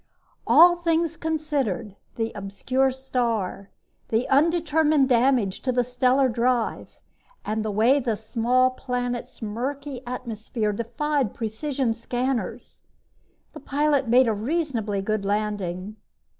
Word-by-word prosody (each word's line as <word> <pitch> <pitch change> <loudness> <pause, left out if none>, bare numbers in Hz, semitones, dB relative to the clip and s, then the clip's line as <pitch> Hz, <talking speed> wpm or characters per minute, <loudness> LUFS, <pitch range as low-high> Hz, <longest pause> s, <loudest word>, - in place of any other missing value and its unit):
All 345 +1 +7
things 335 -1 0
considered 290 - -2 0.2
the 225 -1 -2
obscure 220 +7 0
star, 235 -7 -2 0.4
the 225 +2 +1
undetermined 310 -1 +3
damage 240 -5 +2
to 255 - 0
the 245 0 +2
stellar 255 +2 +2
drive 240 0 -1 0.5
and 215 +1 -1
the 215 - -2
way 225 +7 +3
the 235 -4 -1
small 240 +4 +1
planet's 245 -2 -4
murky 260 +5 -4
atmosphere 230 -3 -3
defied 245 +3 -1
precision 240 +2 -2
scanners 245 +2 -4 0.7
the 310 - -9
pilot 285 -1 +1
made 245 +2 +5
a 225 - +2
reasonably 225 - -2
good 215 0 -1
landing. 205 -1 -2
245 Hz, 115 wpm, -24 LUFS, 220-275 Hz, 0.7 s, All